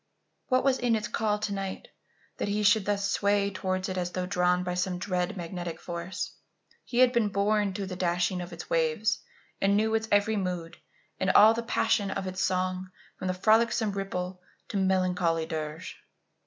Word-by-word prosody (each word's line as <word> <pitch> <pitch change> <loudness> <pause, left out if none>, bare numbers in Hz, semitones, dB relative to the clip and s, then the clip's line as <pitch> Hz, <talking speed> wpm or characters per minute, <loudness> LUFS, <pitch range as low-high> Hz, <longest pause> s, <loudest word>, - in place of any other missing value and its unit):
What 255 -1 +2
was 265 -1 +2
in 240 -2 +2
its 215 -1 -2
call 210 -1 0
to 210 -1 -3
night 195 -1 -5 0.5
that - - -2
he 210 +1 0
should 205 0 +4
thus 200 -1 0
sway 200 0 +1
towards 185 0 -2
it 185 -1 -2
as 180 0 -3
though 185 -1 -2
drawn 180 -1 +1
by 180 0 -2
some 180 0 -1
dread 180 0 -2
magnetic 175 -1 -5
force? 175 +2 -5 0.5
He 240 - -5
had 255 0 +6
been 235 -3 +3
born 200 0 +1
to 200 - -3
the 185 -1 -5
dashing 180 +1 0
of 175 0 -7
its 170 0 -8
waves 165 +7 +1 0.4
and 200 +1 +3
knew 220 +1 +1
its 220 0 0
every 205 +2 +3
mood 180 -4 -3 0.4
and 190 - +1
all 215 +3 +8
the 230 - -2
passion 215 -3 +1
of 195 0 -3
its 185 0 -3
song 185 0 -1 0.3
from 185 - -1
frolicsome 220 +3 +3
ripple 185 -2 -4 0.3
to - - -2
melancholy 180 -3 +1
dirge. 160 +2 -5
190 Hz, 180 wpm, -28 LUFS, 180-210 Hz, 0.5 s, all